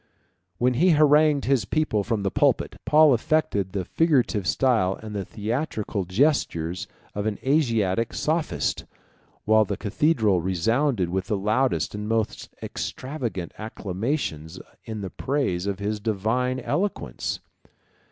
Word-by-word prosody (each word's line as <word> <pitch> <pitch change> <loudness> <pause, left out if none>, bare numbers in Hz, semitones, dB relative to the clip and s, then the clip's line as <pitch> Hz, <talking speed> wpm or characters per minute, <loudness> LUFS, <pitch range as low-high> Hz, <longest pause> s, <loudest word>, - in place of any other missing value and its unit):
When 125 +6 +2
he 170 +10 +3
harangued 150 -1 +4
his 135 -4 +2
people 110 -2 0
from 110 -1 -1
the 100 - 0
pulpit, - - +1
Paul 155 -2 +6
affected 115 - 0
the 95 -2 -3
figurative 130 - +1
style 110 -8 +2
and 110 -1 -8
the 100 -2 -3
theatrical 110 - -3
gestures 95 - 0 0.3
of 105 +1 -2
an 105 - -2
Asiatic 115 -7 +1
sophist, 155 0 -1 0.6
while 110 +1 +5
the 105 - -3
cathedral 110 - +2
resounded 100 - +1
with 95 0 -2
the 105 -2 0
loudest 110 +7 +1
and 105 +1 -5
most 110 -1 -1
extravagant 120 - -4
acclamations 95 - -3 0.3
in 110 -2 -5
the 95 -2 -5
praise 115 -10 -1
of 100 -1 -1
his 105 +2 -2
divine 115 +5 0
eloquence. 200 +8 -2
110 Hz, 130 wpm, -25 LUFS, 100-135 Hz, 0.6 s, Paul